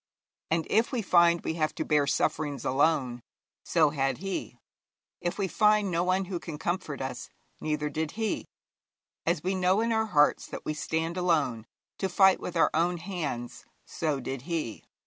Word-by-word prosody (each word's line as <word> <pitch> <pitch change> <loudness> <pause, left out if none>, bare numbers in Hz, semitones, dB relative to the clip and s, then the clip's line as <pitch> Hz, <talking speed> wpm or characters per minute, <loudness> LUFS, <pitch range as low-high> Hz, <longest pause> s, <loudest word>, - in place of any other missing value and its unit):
And 165 0 +1
if 225 +2 +2
we 240 -4 -1
find 170 -2 +4
we - - -2
have 155 -2 -1
to - - -2
bear 150 -2 +2
sufferings 145 -2 0
alone, 130 -3 +1 0.4
so 155 -4 +3
had 135 -2 0
he; 195 0 -4 0.6
if 175 - -3
we 200 -2 0
find 210 0 +3
no 170 0 +1
one 185 +1 +1
who 180 -2 -4
can 160 -3 -7
comfort 170 -5 -3
us, 125 -2 -5 0.3
neither 150 -1 -1
did 155 +1 -3
he; 220 0 -2 0.8
as 170 -2 +1
we 185 +2 0
know 185 +1 +2
in 230 +1 +1
our 220 0 +1
hearts 150 -7 +3
that - - -8
we 155 - -1
stand 160 +3 -2
alone, 150 -11 +1 0.3
to 190 - 0
fight 190 +1 +5
with 180 - -4
our 165 - +4
own 175 +2 +1
hands, 150 -9 -5 0.2
so 155 -4 -2
did 130 0 -5
he. 155 -10 -3
165 Hz, 175 wpm, -28 LUFS, 150-185 Hz, 0.8 s, fight